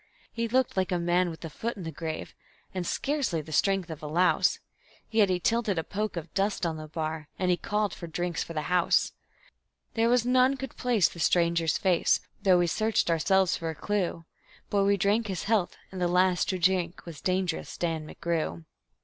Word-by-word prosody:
He 230 0 -1
looked 255 +2 +1
like 190 -1 0
a 180 - +2
man 175 +1 +2
with 165 0 -8
a - - -5
foot 230 +8 -4
in 190 - -6
the 165 - -4
grave 160 -1 -5 0.4
and 180 -2 -3
scarcely 275 - 0
the 155 +1 -8
strength 190 +2 +1
of 160 0 -7
a 150 - -5
louse, 175 +4 +3 0.5
Yet 215 -3 +4
he 180 -1 +1
tilted 220 -1 +1
a 160 - 0
poke 205 +2 -3
of 165 - -6
dust 195 -1 0
on 160 -2 -1
the 155 0 -7
bar, 155 -1 -4
and 185 -1 +1
he - - +4
called 210 0 -1
for 170 - -7
drinks 175 0 -2
for 165 - -8
the 155 -2 -2
house. 180 +3 +2 0.8
There 230 0 +2
was 245 -1 +3
none 255 +2 +4
could 270 -1 -7
place 235 -8 +3
the 170 - -10
stranger's 170 -1 +2
face, 180 -3 +3 0.2
though 185 -2 +5
we 175 - +3
searched 215 +1 +1
ourselves 185 +2 +3
for 165 - -4
a 160 - -4
clue; 180 -3 -2 0.5
But 200 -1 +3
we 200 0 +3
drank 210 +4 +2
his 190 -4 -3
health, 210 -4 +1
and 190 -1 -6
the 175 - +3
last 180 0 +2
to 185 - 0
drink 180 -1 +1
was 165 -4 -9
Dangerous 185 -2 -1
Dan 165 -3 -2
McGrew. 160 - -3
180 Hz, 205 wpm, -28 LUFS, 165-205 Hz, 0.8 s, though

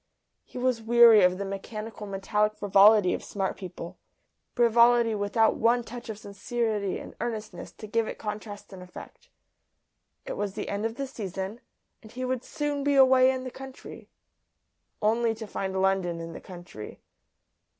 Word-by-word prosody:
He - - -11
was 250 -2 0
weary 230 -1 +7
of 180 0 +4
the 200 - -4
mechanical 210 +2 -6
metallic 210 +2 0
frivolity 205 -1 +5
of - - -4
smart 195 -2 -3
people, 180 -2 -9 0.6
frivolity 235 -1 +5
without 210 +2 +2
one 235 +2 +3
touch 240 +1 -9
of 215 - -5
sincerity 210 0 -2
and - - -9
earnestness 220 -3 -5
to - - -10
give 225 +1 0
it - - -6
contrast 210 -1 -7
and 185 - -10
effect. 180 0 -12 1.0
It - - -4
was 205 -1 -3
the 210 - -4
end 205 +2 -1
of 225 - -8
the 275 - -3
season, 200 -2 -6 0.4
and 220 - -14
he 255 +1 -4
would 255 -1 -2
soon 290 -1 -3
be 285 0 +2
away 260 -1 +6
in 260 -1 -1
the 255 - -6
country 265 +1 -11 0.9
only 225 +1 +2
to 220 - -7
find 190 -2 -3
London 190 -3 +1
in 165 0 -7
the - - -9
country. 175 - -10
215 Hz, 160 wpm, -27 LUFS, 195-240 Hz, 1.0 s, weary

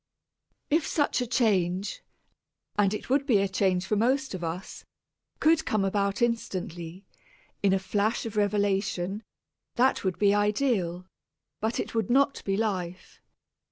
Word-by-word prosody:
If 315 +2 +2
such 290 -4 +1
a 245 - -2
change, 200 - +1 0.7
and 205 -2 +3
it 210 - -4
would 280 +1 +2
be 235 -7 +5
a 195 0 +2
change 190 -1 +1
for 210 - 0
most 265 +4 +1
of 185 -2 -5
us, 170 +4 -5 0.6
could 320 0 +4
come 210 -3 0
about 200 +3 0
instantly, 185 -6 -3 0.6
in 200 - +3
a 195 - +4
flash 205 +5 -1
of 225 -2 -5
revelation, 200 -2 0 0.5
that 255 +2 +2
would 185 -2 -1
be 205 -1 +4
ideal, 205 -4 0 0.5
but 220 +2 -1
it - - -4
would 225 -4 -1
not 275 +3 +3
be 195 0 0
life. 185 -5 -3
205 Hz, 145 wpm, -27 LUFS, 190-230 Hz, 0.7 s, be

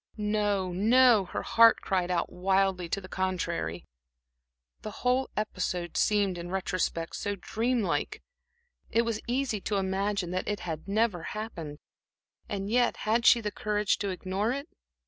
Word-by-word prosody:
No, 205 -3 0
no 225 +2 +5
her - - -4
heart 230 0 +5
cried 185 -3 0
out 175 -2 -1
wildly 190 -1 +1
to 200 - -1
the 185 - -10
contrary. 175 - -2 1.0
The - - -5 0.2
whole 255 +1 +2
episode 180 -4 -2
seemed, 200 -4 +2
in 170 - -6
the - - -8
retrospect, 185 -3 -2
so 205 0 -2
dream 230 +5 -1
like. 175 - -2 0.7
It 230 - +2
was 230 -2 -2
easy 245 -4 -1
to 210 - -2
imagine 195 -1 -1
that 185 0 -2
it 205 -1 -2
had 160 0 -5
never 205 -3 +1 0.2
happened. 165 -9 -6 0.7
And 195 -1 -3
yet, 245 0 +2
had 230 +2 +2
she 235 - +7
the 210 -1 -3
courage 210 -1 0
to 200 - -2
ignore 190 +4 -2
it?... 280 +3 -5
200 Hz, 155 wpm, -29 LUFS, 185-220 Hz, 1.0 s, she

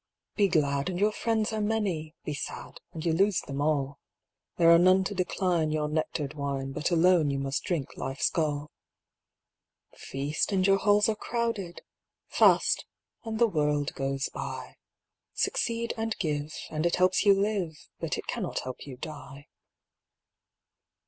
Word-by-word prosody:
Be 205 -2 +4
glad, 140 -3 +1
and 180 -1 -3
your 210 +2 +3
friends 220 0 0
are 215 - -1
many; 195 -8 -1
Be 150 - -2
sad, 145 - -6
and 160 0 -7
you 165 - +2
lose 195 +3 +3
them 140 0 -5
all; 140 -2 0 0.6
There 170 -1 +6
are 170 - +8
none 185 +2 +5
to 205 - -3
decline 180 -3 0
Your 155 -1 0
nectared 150 -1 -2
wine, 140 -2 -3
But 150 +2 -1
alone 170 -2 +4
you 140 - -1
must 135 +1 -2
drink 170 -8 -2
life's 135 +1 -1
gall. 150 -2 -1 1.2
Feast, 140 +8 -2
and 190 -2 +2
your 195 0 +5
halls 205 +1 +4
are 220 - +1
crowded; 225 -6 -3 0.5
Fast, - - +4 0.4
and 220 -1 -3
the 235 - +5
world 150 -7 0
goes 135 0 -2
by; - - -6 0.6
Succeed 235 0 0
and 225 0 -2
give, 150 -3 -2 0.2
And 155 +2 0
it 170 - +1
helps 185 0 +3
you 200 -2 +6
live, 195 -6 -1 0.2
But - - -2
it - - -6
cannot - - -3
help 130 +2 -7
you 130 -3 -8
die. 145 -1 -9
165 Hz, 155 wpm, -28 LUFS, 145-200 Hz, 1.2 s, are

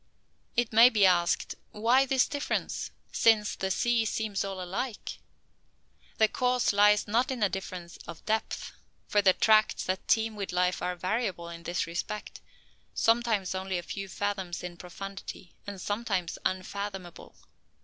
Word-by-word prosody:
It 240 -2 +1
may 230 +3 +9
be 210 -5 +4
asked, 175 -2 +2 0.2
Why 245 +5 +3
this 265 -1 +3
difference, 290 -1 -2 0.2
since 215 -2 +3
the 190 - -2
sea 235 +4 +2
seems 215 -2 -1
all 195 -1 -5
alike? 195 +6 -4 1.0
The 220 - +5
cause 250 -1 +1
lies 210 +1 +5
not 235 +5 +2
in 255 -5 -1
a 205 - +4
difference 185 -2 -6
of 170 -1 -9
depth: 220 0 -2 0.4
for 205 - +3
the 190 -2 +5
tracts 215 +1 +3
that 185 0 -3
teem 225 -1 +2
with 200 -2 -4
life 180 0 +1
are 180 - -1
variable 185 -2 -2
in 170 0 -8
this 175 +2 -2
respect, 175 +5 -5 0.5
sometimes 225 -5 +2
only 190 0 -2
a 175 - -4
few 195 +2 -5
fathoms 190 -4 -3
in 175 -1 -6
profundity, 185 0 -8
and 200 -1 -6
sometime 205 -2 -1 0.2
unfathomable. 190 -1 -4
200 Hz, 150 wpm, -29 LUFS, 185-225 Hz, 1.0 s, may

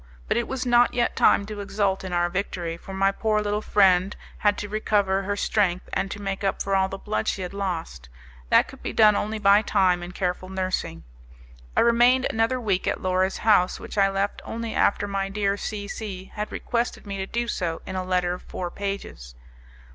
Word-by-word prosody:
But - - +1
it 235 0 0
was 265 -1 -3
not 240 0 +4
yet 240 -1 +1
time 200 - +4
to 210 0 -7
exult 200 -1 -1
in 185 - -5
our 175 0 +2
victory, 175 -2 -3
for 170 - -11
my 195 +1 +2
poor 215 +1 0
little 210 0 -1
friend 190 -2 +3 0.2
had 205 -1 +2
to 205 - -4
recover 205 -2 +1
her 200 +1 -2
strength 190 -3 0
and 195 - -1
to 205 - -6
make 195 -1 -4
up 195 - 0
for 195 0 0
all 190 0 +2
the 195 - -5
blood 215 +2 -3
she 190 - -1
had 180 - -6
lost; 165 - -4 0.4
that - - +5
could - - -13
be - - -4
done 215 -2 +6
only 215 +2 -2
by 200 0 +5
time 185 -5 +2
and 175 +1 -8
careful 185 0 -2
nursing. 185 - -3 0.7
I - - +6
remained 240 +2 +4
another 225 +3 +1
week 200 -6 -1
at - - 0
Laura's 185 +1 +1
house, 205 -4 +3
which - - -9
I 195 -1 +4
left 195 +1 -2
only 230 0 -5
after 205 0 +2
my 195 -1 -2
dear 200 0 0
C 205 0 -5
C 195 -3 -7
had 210 0 -4
requested 235 -1 -2
me 200 -1 -5
to 190 0 -3
do 235 +2 -2
so 170 -7 -3
in 190 - -6
a 185 - -1
letter 180 -1 0
of 180 - -7
four 175 -1 -6
pages. 195 - -6
195 Hz, 210 wpm, -25 LUFS, 185-210 Hz, 0.7 s, done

